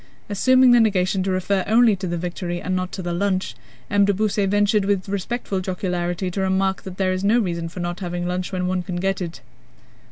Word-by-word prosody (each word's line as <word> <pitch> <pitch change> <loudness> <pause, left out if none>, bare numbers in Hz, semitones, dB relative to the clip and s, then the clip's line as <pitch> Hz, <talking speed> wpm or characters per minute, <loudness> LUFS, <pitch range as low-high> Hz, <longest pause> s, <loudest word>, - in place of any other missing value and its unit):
Assuming 255 +5 +5
the 240 - +7
negation 195 -3 +2
to 190 - -1
refer 185 +1 0
only 225 0 +5
to 190 0 -5
the 175 0 -2
victory 175 0 -4
and 185 +1 -2
not 185 0 -2
to 190 - -5
the 175 0 -2
lunch, 185 +1 -1 0.3
M. 205 0 +3
de 200 - +3
Beausset 205 -1 +1
ventured 205 +1 +2
with 195 -1 0
respectful 200 +1 -3
jocularity 180 -1 -2
to 195 - -2
remark 190 0 +1
that 190 -1 -9
there 185 -1 +1
is 185 +1 -3
no 210 +4 +4
reason 170 -6 -1
for 180 +2 -7
not 175 +1 -3
having 175 -2 -3
lunch 180 +1 -3
when 180 -1 -2
one 185 0 0
can 180 0 -5
get 190 +2 -1
it. 170 -5 -6
190 Hz, 220 wpm, -22 LUFS, 180-200 Hz, 0.3 s, the